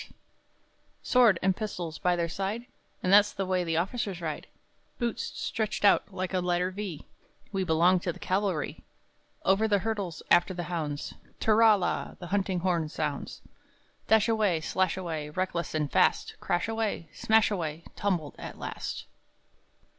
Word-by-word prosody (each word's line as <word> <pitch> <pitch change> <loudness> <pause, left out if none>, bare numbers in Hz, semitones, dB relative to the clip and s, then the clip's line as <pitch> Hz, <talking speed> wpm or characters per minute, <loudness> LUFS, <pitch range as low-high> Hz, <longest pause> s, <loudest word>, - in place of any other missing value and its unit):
[Boisterously] - - -19 0.9
Sword 235 -8 +5
and 190 -1 +3
pistols 175 -7 -5
by 180 0 +2
their 170 -1 0
side, 195 +7 -3 0.4
And 185 - +2
that's 205 0 +7
the 195 - -2
way 185 -1 +1
the 165 -2 -1
officers 195 +1 -1
ride! 155 -3 -4 0.5
Boots 240 -2 -1
stretched 210 -2 -2
out 200 - +4
like 185 0 -4
a 185 - +2
letter 180 +1 0
V, 190 -5 -6 0.5
we 195 -2 0
belong 175 +2 +4
to 175 - -2
the - - -11
cavalry! 185 -5 -1 0.6
Over 195 +3 +4
the 205 -2 +3
hurdles 200 -5 -3
after 175 +2 +4
the 175 - -3
hounds, 150 -4 -3 0.3
tirra 220 -1 +5
la! 180 - -2
the 180 - -8
hunting 190 -3 0
horn 170 -4 0
sounds 150 -2 -4 0.6
Dashaway, 220 -6 +3
slashaway, 165 -3 -1
reckless 185 -3 -1
and 150 -2 -1
fast! - - +2
Crashaway, 210 0 -1
smashaway, 180 -8 +1
tumbled 175 -8 -1
at - - -7
last! - - -5
185 Hz, 145 wpm, -28 LUFS, 170-205 Hz, 0.9 s, that's